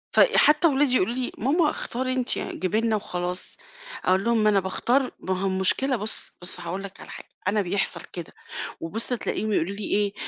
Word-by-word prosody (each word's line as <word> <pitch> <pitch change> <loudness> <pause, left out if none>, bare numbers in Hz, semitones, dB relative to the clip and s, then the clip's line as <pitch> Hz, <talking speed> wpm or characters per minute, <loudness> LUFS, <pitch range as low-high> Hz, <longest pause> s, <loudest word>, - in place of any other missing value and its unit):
ف - - +5 0.2
حتّى 300 +3 +6
ولادي 275 -3 +3
يقولوا 230 0 +2
لي: 255 -1 -2
"ماما 300 +6 +2
اختاري 255 -2 -1
أنتِ، 255 -1 0
جيبي 190 +4 -1
لنا 225 -1 +1
وخلاص." 180 -3 -2 0.5
أقول 185 +1 +3
لهم: 230 -1 +2
"ما 215 - +5
أنا 200 -2 +4
باختار." 245 +8 +1
ما 185 0 -2
هو 195 - +1
المشكلة 190 +8 +2
بُص، 215 -1 -3
بُص 180 0 -2
هاقول 175 +3 -4
لك 195 - -9
على - - -11
حاجة. - - -10 0.2
أنا 205 +2 +2
بيحصل 195 +1 0
كده 175 -2 -7 0.5
وبُص 200 +8 -3
تلاقيهم 215 -2 -1
يقولوا 180 +3 0
لي 210 - -6
إيه، 205 0 +1
210 Hz, 195 wpm, -25 LUFS, 190-250 Hz, 0.5 s, حتّى